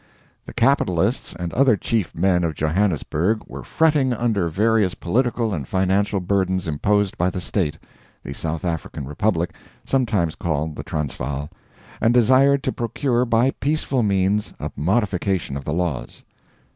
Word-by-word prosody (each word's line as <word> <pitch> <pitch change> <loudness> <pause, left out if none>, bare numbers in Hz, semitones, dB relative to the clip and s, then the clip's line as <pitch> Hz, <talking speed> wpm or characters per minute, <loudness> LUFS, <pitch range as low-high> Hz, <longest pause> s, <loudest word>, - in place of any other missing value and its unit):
The - - -8
capitalists 115 -6 +1
and 85 -1 -4
other 130 -4 +4
chief 110 -5 -1
men 90 +1 +2
of 80 -2 -1
Johannesburg 90 +4 0
were - - -8
fretting 150 -5 +2
under 110 -7 0
various 105 +1 +2
political 115 +2 0
and 70 -7 -4
financial 95 +2 +1
burdens 95 -1 0
imposed 100 +6 0
by 90 +1 +2
the 90 - -4
State 90 -4 -1 0.5
(the - - -6
South 80 +1 -3
African 80 -4 -4
Republic, 85 +4 -1 0.3
sometimes 105 -11 +1
called 80 -1 -2
"the - - -5
Transvaal") 70 -1 -4 0.5
and 115 +2 +3
desired 130 +3 +4
to - - 0
procure 120 +1 0
by 120 +2 +3
peaceful 140 -3 -1
means 100 0 +1
a - - -4
modification 95 - 0
of 70 -1 -6
the 75 - -2
laws. 85 -6 -3
95 Hz, 145 wpm, -22 LUFS, 85-115 Hz, 0.5 s, other